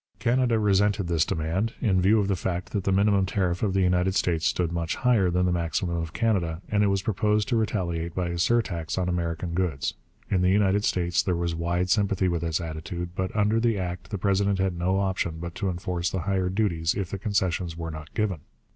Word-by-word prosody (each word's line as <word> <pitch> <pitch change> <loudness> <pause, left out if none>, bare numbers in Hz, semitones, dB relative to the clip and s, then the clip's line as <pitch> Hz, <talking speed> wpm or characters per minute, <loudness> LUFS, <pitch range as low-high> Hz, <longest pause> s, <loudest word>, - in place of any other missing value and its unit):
Canada 120 0 +2
resented 105 -2 +2
this 85 -2 +2
demand, 85 +9 -1
in 95 -6 +2
view 105 +4 +4
of 100 - +1
the 100 - +1
fact 90 -1 -3
that 100 -3 -2
the 95 - +2
minimum 100 0 +3
tariff 90 -2 -1
of 100 -4 +1
the 95 - +3
United 90 +1 +2
States 85 -4 +1
stood 85 -2 0
much 85 -1 -2
higher 115 -7 +3
than 90 +1 +1
the 90 - +2
maximum 85 +1 -1
of 80 -1 -3
Canada, 90 -8 0
and 105 -1 +2
it - - +3
was 100 -1 0
proposed 105 0 +1
to 125 - 0
retaliate 85 -7 -1
by 90 -2 -1
a 85 0 -3
surtax 90 -5 0
on 90 -1 0
American 85 -1 -2
goods. 80 -7 -1 0.3
In 95 -3 +1
the 90 - +3
United 100 +1 +3
States 85 -1 +1
there 90 - 0
was 85 0 -1
wide 85 +2 -1
sympathy 100 -3 +2
with 85 -2 -1
this 80 -1 -1
attitude; 85 +1 -5
but 95 0 -1
under 105 +1 +2
the 115 -2 +1
act 90 -1 -4
the 105 - -3
president 100 +1 +1
had 95 -1 0
no 90 +3 0
option 95 -4 -1
but 85 0 -6
to 100 0 -2
enforce 90 0 -2
the 95 - -2
higher 95 +1 0
duties 90 -5 0
if 95 -3 -3
the 100 - -4
concessions 90 -4 -1
were 80 -1 -4
not 80 0 -9
given. 105 -6 0
90 Hz, 220 wpm, -26 LUFS, 85-100 Hz, 0.3 s, view